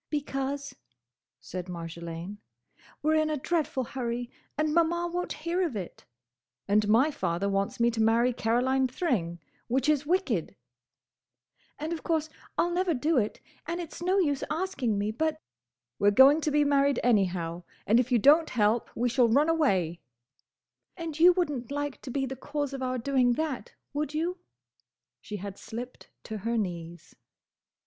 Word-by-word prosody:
"Because," 280 -1 -3 0.6
said 180 0 -6
Marjolaine, 170 +3 -6 0.6
"we 310 - +3
're - - +4
in 310 - 0
a 305 - 0
dreadful 295 -3 -1
hurry 240 -1 -4 0.3
and 305 0 +1
Maman 340 +1 +1
won't 355 0 -2
hear 345 +2 +1
of 330 -10 -1
it—" 185 -4 -7 0.6
"And 205 +1 +3
my 240 +9 +4
father 180 - -1
wants 195 +2 -1
me 235 0 +4
to 225 -1 -1
marry 230 +3 +3
Caroline 255 +4 +1
Thring, 225 - -1 0.3
which 260 +3 0
is 300 -2 +3
wicked—" 370 +4 0 1.2
"And 315 +3 -3
of 330 - -5
course 315 -2 0 0.3
I'll 345 - +2
never 355 -1 +1
do 295 +3 +2
it, 210 -1 -3 0.3
and 340 +1 -2
it's 335 -1 -7
no 370 +3 +2
use 290 -8 +1
asking 305 - -1
me, 205 +1 0
but—" 310 +6 -1 0.6
"We're 205 - +5
going 270 +9 +7
to 305 - 0
be 295 0 +4
married 280 -1 +3
anyhow, 180 -7 +1 0.2
and 225 +3 +4
if 250 +1 0
you 245 - +5
don't 300 +7 +5
help 220 0 +1
we 245 +2 +1
shall 245 -1 +3
run 285 +7 +4
away—" 190 - +1 1.0
"And 325 -3 -5
you 350 +2 +8
would 350 -4 0
n't 250 -4 -5
like 290 -1 -3
to - - -8
be 270 +2 -1
the 265 0 -5
cause 290 +1 -3
of 270 - -5
our 255 0 -1
doing 250 0 +2
that, 300 -1 -3 0.2
would 300 +1 -2
you?" 345 +4 -1 0.8
She 210 - -7
had 200 0 -7
slipped 245 +3 -8
to 220 -1 -6
her 230 +4 -1
knees. 170 -4 -5
265 Hz, 165 wpm, -28 LUFS, 215-310 Hz, 1.2 s, you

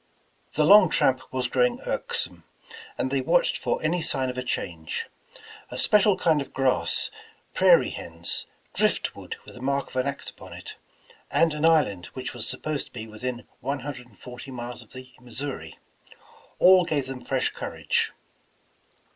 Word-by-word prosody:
The 150 - +3
long 200 +1 +8
tramp 130 -3 +1
was 130 -1 0
growing 245 - +2
irksome, - - -2 0.5
and 130 - -1
they 135 -1 +1
watched 170 +7 +3
for - - -1
any 170 +3 +1
sign 130 -4 +1
of 125 - -10
a - - -1
change. 85 -10 -3 0.6
A - - -6
special 210 -2 +5
kind 160 -5 +3
of 140 - -8
grass, 130 -11 +2 0.4
prairie - - +5
hens, 85 +1 -2 0.3
driftwood - - 0
with - - -11
the 125 - -11
mark 140 +1 0
of - - -14
an 130 +2 +1
axe 140 - -4
upon - - -12
it, - - -8 0.5
and 165 -2 +3
an 150 +1 0
island 135 - +3
which 130 -1 -5
was - - -5
supposed 155 -2 -3
to - - -22
be 110 -2 -6
within 120 +3 -5
one 140 0 -3
hundred 125 -3 -7
and 105 -5 -23
forty 125 +2 -9
miles 120 -1 -6
of 115 - -14
the 130 0 -10
Missouri, 125 - -6 0.8
all 185 0 +7
gave 150 -6 -1
them 130 -1 -7
fresh 130 +1 0
courage. - - -1
130 Hz, 165 wpm, -26 LUFS, 125-155 Hz, 0.8 s, long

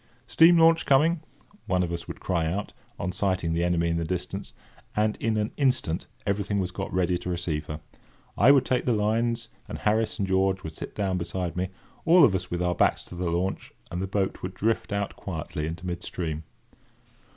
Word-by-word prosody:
"Steam 165 +8 +6
launch, 165 0 +5
coming!" 155 +5 +4 0.5
one 90 -1 +2
of 85 - -2
us 85 -1 -5
would - - -7
cry 85 -3 0
out, 100 +5 -3 0.3
on 90 - -1
sighting 90 -3 0
the 85 +1 +1
enemy 85 -1 +2
in 85 0 0
the 85 - -1
distance; 90 +2 -4 0.4
and, 105 0 +2
in 110 -1 0
an 105 0 0
instant, 130 - +1 0.2
everything 100 0 0
was 90 -1 -1
got - - -5
ready 90 -1 +1
to 90 - -5
receive 85 -4 -2
her. 75 0 -5 0.6
I 120 +8 +7
would 135 -2 +5
take 125 -1 +1
the 125 - +3
lines, 115 +2 0 0.2
and - - -5
Harris 110 +1 +1
and 100 - -1
George 95 0 +1
would 80 - -6
sit - - -8
down 95 -3 0
beside 90 0 -3
me, 90 0 -1 0.3
all 170 -1 +7
of 105 - +3
us 90 -1 -2
with 90 0 -1
our 90 0 +1
backs - - +2
to - - -10
the 90 0 -1
launch, 90 +3 -2 0.2
and 90 +1 -3
the 95 - -2
boat 95 0 -1
would 90 0 -5
drift 115 0 0
out 100 -1 -2
quietly 80 -4 -4
into 85 +3 -6
mid 90 -1 -3
stream. 80 -3 -4
95 Hz, 205 wpm, -27 LUFS, 85-110 Hz, 0.6 s, I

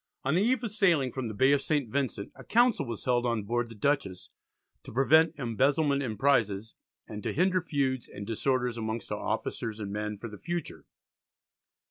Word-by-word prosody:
On 140 - +1
the 180 - +3
eve 245 +3 +2
of 230 - -3
sailing 175 - +2
from 130 -1 -4
the 110 - -5
Bay 130 +6 +4
of 140 -1 +3
St. 145 -5 0
Vincent 125 -5 -2
a - - -13
council 235 - +3
was 115 -3 -6
held 125 -1 +2
on 115 -3 0
board 120 +3 -1
the 115 - -10
Dutchess 105 -6 -1 0.5
"to - - -10
prevent 155 +6 +4
embezzlement 140 +3 +1
in 115 -6 -3
prizes, 110 -5 +1 0.3
and 105 -1 -7
to - - -2
hinder 185 +2 +2
feuds 135 -6 -1
and 100 - -8
disorders 125 +1 0
amongst 110 +1 -4
our - - -2
officers 110 -1 -3
and 100 -2 -5
men 105 0 -3
for 115 - -7
the 105 -2 -10
future." 175 0 -5
130 Hz, 190 wpm, -29 LUFS, 110-145 Hz, 0.5 s, Bay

